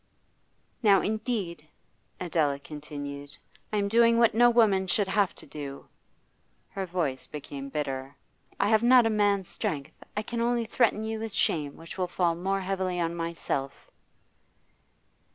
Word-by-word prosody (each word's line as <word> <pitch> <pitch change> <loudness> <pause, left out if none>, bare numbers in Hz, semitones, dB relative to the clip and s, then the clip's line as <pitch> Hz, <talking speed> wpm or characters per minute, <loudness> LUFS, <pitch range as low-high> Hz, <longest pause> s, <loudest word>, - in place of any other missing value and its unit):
'Now 205 -4 +5
indeed,' 210 - -2 0.5
Adela 155 -5 +1
continued, 145 -1 -8 0.3
'I 215 - 0
am 200 -1 +1
doing 230 +2 +5
what 230 -1 +5
no 240 +2 +6
woman 210 -5 +4
should 200 +2 +2
have 195 0 +1
to - - -11
do.' 140 -2 -8 0.8
Her 195 -1 -4
voice 165 -7 -2
became 140 -2 -7
bitter. 135 -1 -3 0.4
'I 200 - +3
have 220 -1 +4
not 245 0 +6
a 225 - +2
man's 205 -3 +2
strength; 140 -3 -4
I 210 - 0
can 230 +2 -3
only 235 0 +1
threaten 220 -1 +2
you 220 0 -3
with 220 -2 -5
shame 150 -6 0
which 165 +3 -10
will 180 - +1
fall 175 -1 +1
more 190 +3 -1
heavily 185 -1 -1
on 170 -1 0
myself. 165 -5 -4
190 Hz, 150 wpm, -28 LUFS, 150-220 Hz, 0.8 s, no